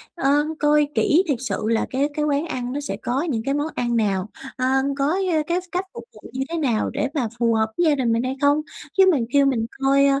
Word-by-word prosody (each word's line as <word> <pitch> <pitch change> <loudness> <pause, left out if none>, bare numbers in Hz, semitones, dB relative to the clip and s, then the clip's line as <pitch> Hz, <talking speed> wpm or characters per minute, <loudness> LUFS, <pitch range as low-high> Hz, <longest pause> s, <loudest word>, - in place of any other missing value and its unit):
ờ, 275 -5 +1 0.3
coi 295 0 +3
kỹ 335 +5 +3
thiệt 285 -6 +1
sự 255 -3 -3
là 225 0 +1
cái 270 +2 0
cái 300 0 -1
quán 290 +1 0
ăn 250 -6 -4
nó 285 - -2
sẽ 285 - -4
có 255 +3 -1
những 225 -6 -1
cái 275 - 0
món 290 +1 -1
ăn 240 -1 -1
nào, 200 -3 0 0.3
ờ, 255 - -1 0.3
có, 275 - +1 0.3
ờ, 310 -1 +2
cái 345 - +1
cách 365 +1 -2
phục 235 - -8
vụ 215 - -13
như 260 - -3
thế 335 - -3
nào 245 -9 0
để 280 +2 -1
mà 270 -7 0
phù 230 -1 +2
hợp 220 0 +1
với 345 - +2
gia 295 - +3
đình 250 -4 0
mình 230 +1 0
hay 255 +1 -2
không. 285 +1 +3 0.4
Chứ 385 - +7
mà 315 - +2 0.2
kêu 280 -1 +5
mình 245 -5 +1 0.2
coi, 275 +1 +4
275 Hz, 255 wpm, -22 LUFS, 235-295 Hz, 0.4 s, Chứ